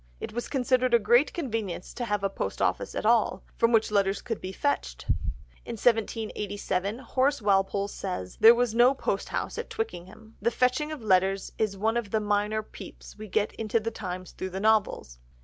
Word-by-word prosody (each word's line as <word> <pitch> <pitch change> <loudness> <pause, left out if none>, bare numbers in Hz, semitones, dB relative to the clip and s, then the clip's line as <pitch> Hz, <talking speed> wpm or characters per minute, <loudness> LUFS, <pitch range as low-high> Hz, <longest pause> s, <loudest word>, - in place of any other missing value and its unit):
It - - -6
was 240 +1 -3
considered 255 -2 +2
a - - +8
great 240 +6 +3
convenience 225 - -4
to 240 - -4
have 210 -3 -1
a - - +3
post - - -4
office - - -1
at - - -3
all, 230 -1 +3
from 230 0 +3
which 225 -2 +3
letters 200 -1 +2
could 225 -3 -5
be 185 - -5
fetched. 285 +9 -2 0.6
In 235 - -6
1787, 210 -3 -1
Horace 270 +2 0
Walpole 200 -1 +1
says 180 - -5
there 230 +1 +9
was 240 -2 +1
no 245 +3 +5
posthouse 270 - -3
at 470 - -5
Twickenham. 220 - -6
The - - +3
fetching 255 +6 +1
of 300 -7 -7
letters 190 -1 +2
is 210 -3 0
one 220 +4 +1
of 230 -4 -3
the 220 - +1
minor 210 +1 0
peeps - - -12
we 215 - -7
get 210 +1 0
into 225 0 +1
the 225 +1 -3
times 185 -3 -6
through 190 - -5
the 190 +1 -5
novels. 210 - +1
220 Hz, 185 wpm, -27 LUFS, 200-240 Hz, 0.6 s, there